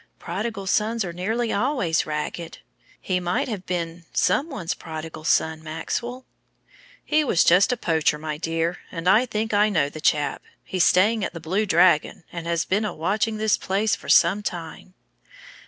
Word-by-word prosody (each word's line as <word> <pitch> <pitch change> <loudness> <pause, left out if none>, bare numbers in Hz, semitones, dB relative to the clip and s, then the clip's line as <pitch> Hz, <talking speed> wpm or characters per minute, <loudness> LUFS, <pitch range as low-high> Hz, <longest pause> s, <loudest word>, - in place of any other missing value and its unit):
"Prodigal 200 +3 -4
sons 215 +3 +1
are 170 - -5
nearly 220 +7 -1
always 205 - 0
ragged. 155 +2 -4 0.4
He 185 -1 -1
might 180 0 -1
have 205 -6 -5
been 170 -1 -4
some 310 - +1
one's 185 - -3
prodigal 160 -2 -8
son, 160 0 +1
Maxwell." 235 +11 -4 0.8
"He 310 0 +2
was 215 - +3
just 180 +6 +5
a 250 - 0
poacher, 160 -6 +1
my 155 0 -5
dear, 165 +1 -1
and 165 0 -5
I 220 +7 +5
think 220 -1 -2
I 210 +1 +4
know 155 -8 +1
the 155 +1 -9
chap. 150 -1 +1 0.2
He's 185 -2 +1
staying 210 +4 +3
at - - -3
the - - -5
Blue 190 +7 -1
Dragon, 175 -2 +3
and 170 -1 -6
has 170 -1 0
been 205 +3 0
a 215 - -3
watching 215 +7 0
this 215 0 +2
place 205 +3 0
for - - -11
some 190 +5 +5
time." 175 0 -7
180 Hz, 170 wpm, -24 LUFS, 165-215 Hz, 0.8 s, just